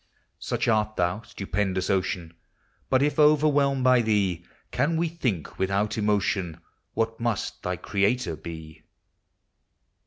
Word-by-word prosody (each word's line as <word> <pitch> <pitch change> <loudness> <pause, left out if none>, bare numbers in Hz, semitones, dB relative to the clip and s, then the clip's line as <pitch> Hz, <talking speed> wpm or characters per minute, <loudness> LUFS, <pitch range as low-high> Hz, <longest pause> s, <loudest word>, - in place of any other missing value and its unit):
Such - - -2
art 110 -1 +2
thou, 90 +4 0
stupendous 95 -3 -2
Ocean! 90 -3 -1 0.6
But, 130 +1 +3
if 150 +2 0
overwhelmed 145 -3 +4
by 125 -1 +5
thee, 100 -6 +1 0.3
Can 150 +6 +1
we 170 +1 +1
think, 125 - -3
without 100 +2 0
emotion, 100 -5 0 0.4
What 115 0 -1
must 115 -3 -2
thy - - -2
Creator 100 -3 0
be 80 0 -9
105 Hz, 120 wpm, -26 LUFS, 95-130 Hz, 0.6 s, by